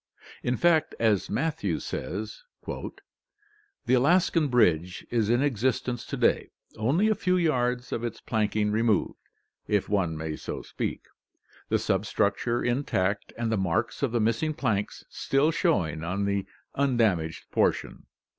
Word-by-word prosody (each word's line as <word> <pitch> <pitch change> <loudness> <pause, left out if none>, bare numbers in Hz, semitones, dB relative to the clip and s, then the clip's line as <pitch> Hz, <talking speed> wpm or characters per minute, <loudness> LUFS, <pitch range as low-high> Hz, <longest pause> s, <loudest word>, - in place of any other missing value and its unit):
In 125 0 0
fact, 170 -3 +3
as 110 -4 +2
Matthew 160 0 -1
says: - - -5 0.2
"The 420 - -8
Alaskan 165 +4 +3
bridge 90 - +2
is 115 -3 +1
in 120 +3 +3
existence 125 -2 -1
to - - -4
day, - - +2 0.3
only 140 - +2
a 220 - +4
few 185 -3 +1
yards 125 -7 0
of 115 - -2
its 120 -3 -4
planking 105 -1 0
removed, 110 -2 +1 0.5
if 105 -2 +1
one 90 -6 0
may 80 0 -4
so - - -6
speak, - - -4 0.7
the - - +3
substructure 115 +4 0
intact, 105 -6 0
and 115 -1 -1
the 110 - +1
marks 95 +6 -1
of 140 -4 +1
the 120 - +1
missing 115 +8 +1
planks 110 -9 -2
still 140 +4 +1
showing 85 - 0
on 95 +4 -1
the 100 -1 -1 0.3
undamaged 110 - 0
portion." - - 0
120 Hz, 135 wpm, -27 LUFS, 100-145 Hz, 0.7 s, a